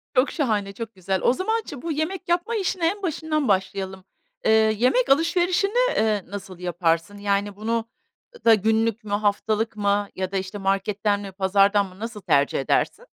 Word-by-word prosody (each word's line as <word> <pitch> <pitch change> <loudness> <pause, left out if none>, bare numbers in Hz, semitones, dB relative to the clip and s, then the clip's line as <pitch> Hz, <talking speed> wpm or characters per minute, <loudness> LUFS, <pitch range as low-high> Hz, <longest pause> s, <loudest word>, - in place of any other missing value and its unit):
Çok 255 +3 +3
şahane, 210 -9 -1
çok 225 -1 -7
güzel. 190 0 -2
O 245 - +4
zaman 440 +8 -1
çi 280 -4 -8
bu 335 - -3
yemek 335 +5 -3
yapma 355 +7 +1
işine 370 -4 0
en 405 +2 -5
başından 310 -3 -1
başlayalım. 190 -1 -1 0.4
Iıı, 220 0 +5
yemek 250 +3 +2
alışverişini, 370 - +2
ııı, 210 -3 0
nasıl 195 -3 -8
yaparsın? 175 +2 -1
Yani 200 0 -1
bunu 225 +2 -2 0.6
da 225 - +8
günlük 220 +1 +1
mü, 205 - -9
haftalık 215 +2 0
mı 205 -1 0
ya 185 0 -3
da 195 - -1
işte 190 +2 -4
marketten 200 +1 0
mi 195 -1 -7
pazardan 200 +1 +3
mı 185 +1 -16
nasıl 225 -2 -6
tercih 140 -4 +2
edersin? 480 - 0
210 Hz, 170 wpm, -24 LUFS, 195-275 Hz, 0.6 s, da